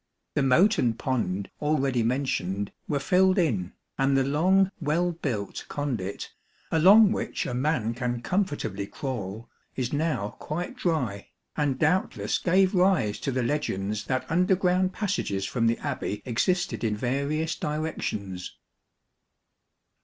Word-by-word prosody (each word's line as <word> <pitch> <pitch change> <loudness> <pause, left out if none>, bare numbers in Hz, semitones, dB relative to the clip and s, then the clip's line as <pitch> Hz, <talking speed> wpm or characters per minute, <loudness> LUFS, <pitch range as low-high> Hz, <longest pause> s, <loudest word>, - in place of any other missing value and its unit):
The - - +1
moat 170 - +4
and 115 -2 +1
pond, 100 -8 -2
already 140 -5 +1
mentioned, 105 -6 -1 0.2
were 145 - 0
filled 185 +7 +3
in, 110 - 0 0.3
and 135 0 +3
the 135 - +3
long 185 +8 +3
well 170 +3 +1
built 120 - -4
conduit, 120 -10 -4 0.4
along 195 +6 +7
which - - -2
a 125 - -3
man 125 -3 0
can 120 0 -3
com 190 +9 +2
fortably 105 - -4
crawl, 115 -5 -5 0.3
is 130 0 -2
now 145 -9 0
quite 170 +4 -4
dry, 125 - -2 0.3
and 145 -3 0
doubtless 165 +6 +1
gave 185 +2 +3
rise 180 - +2
to 135 - -2
the 130 -1 0
legends 105 -6 -2
that 130 -1 -1
underground 180 +2 +2
passages 190 - -2
from 115 +2 0
the 115 - +2
Abbey 105 0 -4
existed 180 +10 0
in 105 -2 0
various 140 +7 -1
directions. 110 - -4
135 Hz, 130 wpm, -27 LUFS, 115-170 Hz, 0.4 s, along